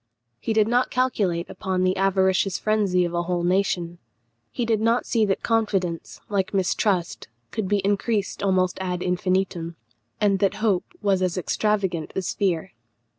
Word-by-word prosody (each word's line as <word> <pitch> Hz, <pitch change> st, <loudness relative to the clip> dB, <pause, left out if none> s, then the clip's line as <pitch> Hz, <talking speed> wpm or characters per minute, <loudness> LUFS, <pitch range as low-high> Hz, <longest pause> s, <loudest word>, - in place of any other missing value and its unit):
He 225 Hz, -, -3 dB
did 215 Hz, -1 st, +3 dB
not 245 Hz, +2 st, +2 dB
calculate 205 Hz, -10 st, 0 dB
upon 185 Hz, -2 st, -2 dB
the 185 Hz, 0 st, +2 dB
avaricious 190 Hz, -1 st, +2 dB
frenzy 200 Hz, -4 st, +1 dB
of 170 Hz, -, -4 dB
a 170 Hz, -, +1 dB
whole 175 Hz, 0 st, -1 dB
nation; 175 Hz, -2 st, 0 dB, 0.5 s
he 240 Hz, -, -2 dB
did 225 Hz, -2 st, +1 dB
not 230 Hz, +2 st, +2 dB
see 225 Hz, -3 st, +2 dB
that 195 Hz, -2 st, -1 dB
confidence, 195 Hz, -7 st, -1 dB
like 195 Hz, -1 st, -1 dB
mistrust, 180 Hz, -, 0 dB, 0.2 s
could 220 Hz, -4 st, -2 dB
be 200 Hz, 0 st, 0 dB
increased 205 Hz, +1 st, 0 dB
almost 185 Hz, -2 st, +1 dB
ad 180 Hz, -1 st, -2 dB
infinitum, 180 Hz, -2 st, -1 dB, 0.4 s
and 200 Hz, -2 st, +2 dB
that 195 Hz, -2 st, +2 dB
hope 210 Hz, -5 st, +1 dB, 0.2 s
was 195 Hz, -2 st, +2 dB
as 185 Hz, -1 st, 0 dB
extravagant 190 Hz, -3 st, -1 dB
as 190 Hz, -2 st, -2 dB
fear. 185 Hz, -2 st, -1 dB
190 Hz, 155 wpm, -24 LUFS, 180-210 Hz, 0.5 s, did